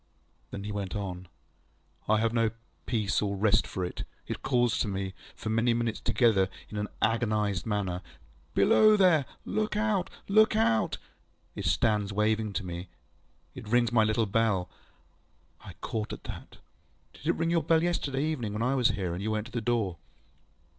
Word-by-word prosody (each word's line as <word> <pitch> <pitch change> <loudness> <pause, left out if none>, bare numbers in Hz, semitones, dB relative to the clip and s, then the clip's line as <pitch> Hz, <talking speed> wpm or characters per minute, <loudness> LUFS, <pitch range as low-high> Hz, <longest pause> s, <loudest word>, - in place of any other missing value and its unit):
ŌĆØ - - -40
Then 100 - -6
he 105 - -4
went 100 -2 -4
on. 95 -3 -5 0.8
ŌĆ£I 110 - +4
have 115 +1 +1
no 115 -2 +3 0.4
peace 110 -5 +1
or 100 -1 -1
rest 110 +2 +3
for 90 - -3
it. 90 - -5 0.2
It - - -5
calls 120 -3 +2
to - - +1
me, 95 -1 -3 0.2
for 110 - -5
many 115 +2 +2
minutes 115 -2 -1
together, 105 -6 +3 0.2
in 105 - -6
an 105 - -2 0.2
agonised 110 -4 +1
manner, 95 -4 -1 0.5
ŌĆśBelow 215 0 +6
there! 175 -8 +4 0.2
Look 215 0 -1
out! 210 -4 +1 0.2
Look 215 +2 +5
out! 110 0 +2
ŌĆÖ - - -32 0.3
It - - -4
stands 105 -2 +2
waving 105 +1 +1
to 100 - -3
me. 85 0 -6 0.6
It - - -9
rings 120 +1 +3
my 115 -2 +4
little 110 +1 +2
bellŌĆöŌĆØ 105 -3 +1 0.9
I - - -11
caught 110 -1 -3
at - - -8
that. - - -9 0.6
ŌĆ£Did - - -15
it - - +4
ring 165 +1 0
your 170 -1 +3
bell 160 0 +3
yesterday 145 -6 0
evening 125 -10 -2
when 105 +2 -1
I 125 +2 +2
was 125 -3 +3
here, 90 -3 -2
and 90 - -4
you 105 - -2
went 110 0 -1
to 125 - -11
the 120 0 -2
door? 110 -6 0
110 Hz, 180 wpm, -29 LUFS, 100-120 Hz, 0.9 s, ŌĆśBelow